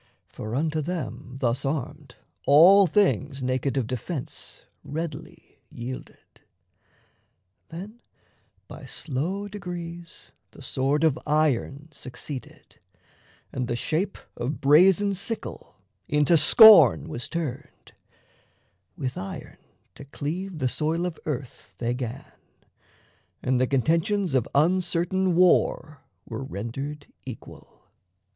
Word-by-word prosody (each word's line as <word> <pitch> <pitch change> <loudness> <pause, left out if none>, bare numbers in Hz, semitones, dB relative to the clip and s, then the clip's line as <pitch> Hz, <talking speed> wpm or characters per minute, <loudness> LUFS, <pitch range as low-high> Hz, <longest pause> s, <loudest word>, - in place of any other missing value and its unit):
For 110 +2 -6
unto 155 +2 0
them, 155 -5 -5
Thus 120 -1 0
armed, 140 -2 -4 0.3
all 180 +7 +7
things 150 -7 +1
naked 130 +1 -1
of 130 - +1
defence 130 +4 -6 0.2
Readily 155 0 -7
yielded. 125 +2 -9 1.3
Then 200 +8 -9 0.7
by - - -10
slow 175 +9 -4
degrees 175 -4 -8 0.2
The - - -13
sword 140 +4 0
of 155 -4 +2
iron 150 -1 0
succeeded, 130 -1 -9 0.7
and 125 -2 -2
the 120 - -1
shape 170 +10 -1 0.2
Of 135 +6 -3
brazen 185 +7 +5
sickle 210 +4 -5 0.3
into 150 +3 +3
scorn 165 - +8
was 120 - -5
turned: 150 -5 -6 1.0
With 130 -1 -4
iron 95 - -8 0.4
to 140 - -12
cleave 170 +6 -5
the 130 -4 0
soil 160 +6 -1
of 175 -3 -5
earth 135 -4 -6
they 120 0 -1
'gan, 125 +1 -5 1.2
And 130 -1 +1
the 130 - +2
contentions 165 - +1
of 130 -4 +1
uncertain 180 +3 +2
war 160 -4 +2 0.2
Were - - -6
rendered 135 +6 -6 0.2
equal. 130 -4 -11
150 Hz, 105 wpm, -25 LUFS, 130-175 Hz, 1.3 s, scorn